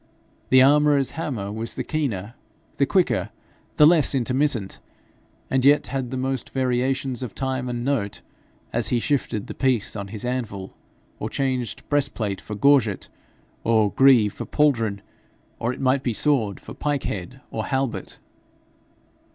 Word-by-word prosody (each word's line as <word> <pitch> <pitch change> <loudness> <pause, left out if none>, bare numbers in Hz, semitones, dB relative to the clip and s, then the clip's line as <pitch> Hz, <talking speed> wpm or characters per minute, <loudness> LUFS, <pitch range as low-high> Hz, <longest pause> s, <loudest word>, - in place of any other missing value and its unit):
The 130 0 +7
armourer's 145 -1 +4
hammer 125 -12 -4
was 110 +2 -5
the - - -3
keener, 120 - -3 0.4
the - - +2
quicker, - - +1 0.5
the 150 - +8
less 155 -3 +5
intermittent, 130 -4 0 0.7
and 130 -1 +1
yet 145 +2 +5
had 130 -3 -2
the 130 - -4
most 130 -1 -2
variations 130 0 -1
of 125 -4 -6
time 130 -2 -2
and 120 0 -3
note, 125 -8 -1 0.5
as - - +2
he 120 - +1
shifted 120 -6 -1
the - - -7
piece 125 -7 0
on 100 -2 -5
his 105 +3 -7
anvil, 110 -7 -4 0.4
or - - -3
changed 130 -3 -2
breastplate 110 -9 -1
for 105 - -7
gorget, 115 -3 +3 0.5
or 110 -3 +3
greave 125 -7 +5
for - - -7
pauldron 115 -9 +1 0.6
or 120 - 0
it 125 - -7
might 130 0 +2
be 125 -3 -1
sword 115 -6 +1
for - - -10
pike 145 -2 -2
head 100 +7 -5
or 110 - -3
halbert. 135 -2 -2
130 Hz, 150 wpm, -23 LUFS, 110-135 Hz, 0.7 s, the